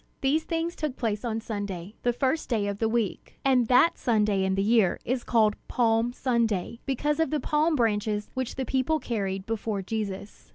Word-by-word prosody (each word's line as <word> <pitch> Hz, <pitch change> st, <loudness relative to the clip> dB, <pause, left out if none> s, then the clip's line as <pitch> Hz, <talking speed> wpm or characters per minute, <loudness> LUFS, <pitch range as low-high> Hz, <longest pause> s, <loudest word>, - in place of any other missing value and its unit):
These 290 Hz, +4 st, +1 dB
things 335 Hz, 0 st, -2 dB
took 300 Hz, -4 st, -3 dB
place 210 Hz, -3 st, -1 dB
on 225 Hz, -2 st, -2 dB
Sunday, 200 Hz, -4 st, -5 dB
the 245 Hz, -, +2 dB
first 265 Hz, +6 st, -1 dB
day 220 Hz, -5 st, +1 dB
of 200 Hz, 0 st, -3 dB
the 225 Hz, -, +1 dB
week; 225 Hz, -4 st, -2 dB
and 255 Hz, -3 st, +4 dB
that 255 Hz, +7 st, +4 dB
Sunday 210 Hz, -4 st, +2 dB
in 190 Hz, 0 st, +1 dB
the 195 Hz, -, +1 dB
year 215 Hz, -3 st, +3 dB
is 250 Hz, +1 st, -1 dB
called 220 Hz, -3 st, +3 dB
Palm 230 Hz, -1 st, +2 dB
Sunday, 235 Hz, -4 st, -1 dB
because 290 Hz, +3 st, 0 dB
of 320 Hz, -, +2 dB
the 305 Hz, -, 0 dB
palm 305 Hz, +2 st, +1 dB
branches 210 Hz, -3 st, 0 dB
which 260 Hz, -2 st, -3 dB
the 265 Hz, -, -2 dB
people 265 Hz, +5 st, +1 dB
carried 195 Hz, -8 st, -3 dB
before 220 Hz, -2 st, -2 dB
Jesus. 205 Hz, -1 st, -5 dB
230 Hz, 190 wpm, -27 LUFS, 210-260 Hz, -, and